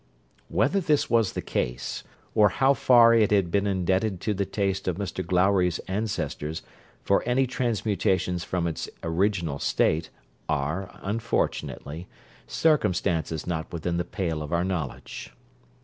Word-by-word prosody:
Whether 200 - +2
this 150 -4 +1
was 115 -5 +3
the - - -4
case, - - -3 0.3
or 105 -1 +5
how 135 +7 +3
far 120 -3 +6
it 110 -3 +4
had 100 -5 +2
been 100 +2 +2
indebted 95 +1 0
to 105 - 0
the 100 -1 -2
taste 95 -2 -1
of 90 - +1
Mr 95 -2 -3
Glowry's 90 -1 +2
ancestors 85 -7 -3 0.4
for 100 - +3
any 130 +2 +3
transmutations 100 -7 0
from 90 -1 -2
its 80 -2 -3
original 85 -3 0
state, 80 +1 +1 0.4
are, 75 +6 -1
unfortunately, 95 -6 -2 0.4
circumstances 90 - +1
not 80 -3 -3
within 85 +1 -2
the 85 - 0
pale 85 -6 -3
of 75 - -6
our 85 0 +1
knowledge. 90 -7 -4
95 Hz, 135 wpm, -26 LUFS, 85-105 Hz, 0.4 s, far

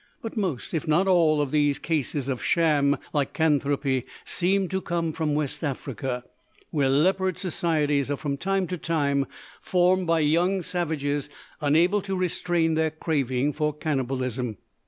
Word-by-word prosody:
But 225 - -5
most, 185 - -2
if 160 0 -2
not 170 +5 +3
all, 165 -5 +4
of 135 - -4
these 145 -2 +2
cases 150 -4 -2
of 130 -3 -2
sham 150 -4 +3 0.2
lycanthropy 140 -3 +1 0.2
seem 190 +2 +1
to 190 0 -1
come 170 -3 -2
from 155 -2 -1
West 150 +1 -2
Africa, 135 -3 -3 0.5
where 145 -4 +2
leopard 185 +6 +2
societies 150 -6 0
are 145 - -1
from 140 -1 -2
time 195 +5 0
to 180 -2 -3
time 140 -4 0 0.3
formed 180 0 +2
by 165 -1 +3
young 175 +5 +2
savages 145 -5 -2 0.3
unable 170 +8 +3
to 190 0 -3
restrain 175 -2 0
their 160 0 +2
craving 145 -3 -1
for 150 +1 0
cannibalism. 130 -6 -2
155 Hz, 145 wpm, -26 LUFS, 140-175 Hz, 0.5 s, all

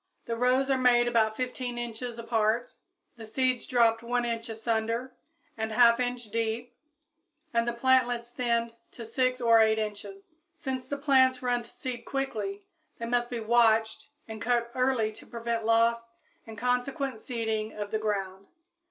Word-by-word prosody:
The 230 - -2
rows 255 +3 +2
are 265 - +2
made 240 -1 +4
about 220 -2 +2
15 250 -1 -3
inches 240 0 -5
apart, 230 0 0 0.4
the 225 - -9
seeds 255 +1 0
dropped 230 -2 +3
1 240 +1 -1
inch 230 -1 -3
asunder 230 +2 -2 0.4
and 220 -1 -3
1/2 235 0 +6
inch 245 -1 -2
deep 230 +2 -2 0.8
and 230 0 +1
the - - +2
plantlets 245 -1 +2
thinned 235 -2 0 0.2
to 230 - -8
6 255 +2 0
or 230 -2 +5
8 220 0 +4
inches. 270 - -6 0.2
Since 260 -5 -4
the 285 - -3
plants 260 -3 +3
run 245 -1 +1
to 235 - -13
seed 245 -2 -6
quickly, 275 - -3 0.3
they 230 - -5
must 240 0 0
be 240 -2 -4
watched 225 -1 +3 0.2
and 220 -1 -8
cut 235 +1 0
early 255 -4 +1
to 215 - -15
prevent 230 -1 -3
loss 230 +1 +2 0.4
and 220 -1 -9
consequent 250 +1 -1
seeding 220 -3 -3
of 205 -1 -6
the 220 - 0
ground. 195 -2 -3
235 Hz, 160 wpm, -28 LUFS, 225-250 Hz, 0.8 s, 1/2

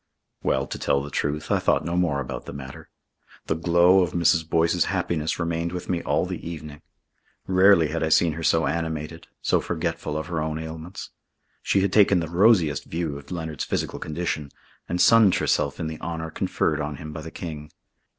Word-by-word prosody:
Well, - - 0
to - - -7
tell 70 0 +1
the 75 - -8
truth, 75 +3 -2
I - - +3
thought - - +1
no 85 - -2
more 85 -6 +1
about 60 -2 -6
the - - -6
matter. 65 -2 -9 0.6
The - - 0
glow 85 +3 +4
of 90 - -1
Mrs. 85 -1 +2
Boyce's 85 +1 +2
happiness 80 -2 -1
remained 85 0 -2
with 90 - -6
me 85 -2 0
all - - 0
the - - -6
evening. 75 -3 -8 0.6
Rarely 95 -4 +5
had 80 +2 -2
I 80 - +1
seen 80 +1 +4
her 80 - -6
so 80 0 +2
animated, 80 0 -3 0.2
so - - +2
forgetful 85 -2 -3
of 80 - -3
her 85 -3 -3
own 80 0 -2
ailments. 80 +3 -7 0.5
She 100 - +2
had 95 -1 0
taken 100 -3 +5
the 80 - -3
rosiest 90 -4 +3
view 80 -3 -3
of 70 - -16
Leonard's 80 -4 -4
physical - - -3
condition 75 -2 -3 0.4
and 90 - -1
sunned 110 -2 +6
herself 70 -2 0
in - - -2
the 80 0 -6
honour 80 -1 -4
conferred 75 0 -1
on 75 0 -3
him 75 +2 -8
by 80 - -6
the 80 - -7
King. 75 -3 -7
80 Hz, 195 wpm, -24 LUFS, 75-85 Hz, 0.6 s, sunned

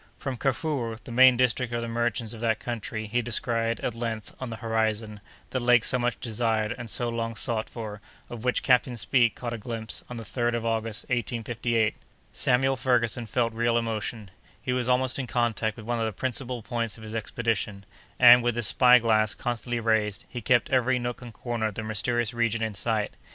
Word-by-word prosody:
From 135 -2 -4
Kafuro, 130 -2 -1
the - - -9
main 130 +1 +7
district 125 -1 +1
of 120 0 -2
the - - -3
merchants 115 -1 -1
of 115 - -9
that 110 -2 +1
country, 110 -2 -4
he 120 +3 0
descried, 115 0 0
at 120 - -2
length, 115 -2 -4
on 130 - -5
the 115 - -5
horizon, 110 -2 -1 0.3
the 130 - 0
lake 120 -1 +4
so 125 - +1
much 120 0 -1
desired 110 -2 0
and 120 -2 -7
so 120 +3 +1
long 115 -1 -3
sought 115 -2 0
for, 105 -3 -7 0.3
of 120 -2 -8
which 125 0 +1
Captain 125 -1 +3
Speke 115 +4 +3
caught 120 -1 -5
a 115 - -5
glimpse 110 0 -4
on 125 - -6
the 115 - -6
3d 120 +2 -1
of 115 -1 -3
August, 115 -1 -1
1858. 115 -1 0 0.4
Samuel 135 +1 +3
Ferguson 120 -2 +1
felt 115 +1 0
real 120 +1 +1
emotion: 110 -2 -3 0.3
he 125 - -2
was 125 -1 0
almost 130 +1 +2
in 130 - -3
contact 115 -3 0
with 110 - -9
one 120 0 -1
of 115 - 0
the 110 - -2
principal 125 -2 -3
points 115 -2 -2
of 110 - -12
his 110 0 -7
expedition, 110 -2 -2 0.3
and, 125 0 +9
with 120 -1 0
his 120 -1 0
spy 125 +3 +6
glass 110 -3 +2
constantly 120 0 -3
raised, 110 -3 0
he 120 - -6
kept 120 +5 +2
every 130 0 +3
nook 120 0 -4
and 120 -1 -9
corner 120 -3 -2
of 105 - -6
the 110 - -4
mysterious 115 +2 0
region 115 -1 0
in 110 -1 -2
sight. 105 +1 -1
115 Hz, 205 wpm, -27 LUFS, 110-120 Hz, 0.4 s, and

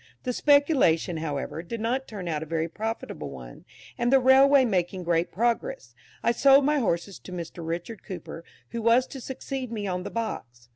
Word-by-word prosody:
The 250 - -1
speculation, 285 - +3
however, 155 0 -4
did 225 +7 -6
not 250 +4 -1
turn 195 -5 -7
out 155 -3 -2
a - - -4
very 165 0 -1
profitable 215 - -5
one, 65 -3 -11 0.3
and, 240 +1 +1
the 270 - +6
railway 265 +1 +6
making 185 -3 -1
great 170 0 0
progress, 240 - -1 0.3
I - - +3
sold 275 +3 +5
my 295 0 +2
horses 190 -4 -1
to - - -12
Mr. 170 -1 -6
Richard 170 +7 -5
Cooper, 170 -2 -8 0.3
who 235 - -4
was 235 +3 +4
to 265 0 -9
succeed 265 -1 -5
me 215 -3 -3
on 180 -2 -2
the 180 - -5
box. 120 - -5
220 Hz, 185 wpm, -26 LUFS, 170-260 Hz, 0.3 s, the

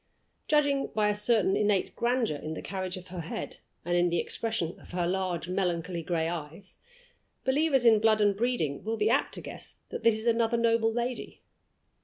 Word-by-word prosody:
Judging 285 -2 +2
by 210 -1 +3
a - - +2
certain 210 -2 +2
innate 205 -2 +1
grandeur 235 - 0
in 155 +2 -5
the - - -6
carriage 185 -1 -4
of 180 0 -11
her 180 0 -6
head 165 - -5 0.3
and 175 0 0
in 175 0 +3
the 170 - 0
expression 220 -2 -2
of - - -15
her 175 -1 0
large 180 -2 -1
melancholy 175 -2 -1
gray 165 -1 -1
eyes, 170 +3 -6 0.7
believers 270 -1 +2
in 225 -2 +7
blood 220 0 +3
and 205 -1 +3
breeding 210 - -1
will 225 +1 -2
be 215 +1 +2
apt 270 - +1
to - - -4
guess - - -9
that - - -5
this 230 -2 +4
is 220 - -7
another 230 0 +2
noble 230 -1 +2
lady. 240 +2 -4
210 Hz, 190 wpm, -29 LUFS, 175-230 Hz, 0.7 s, in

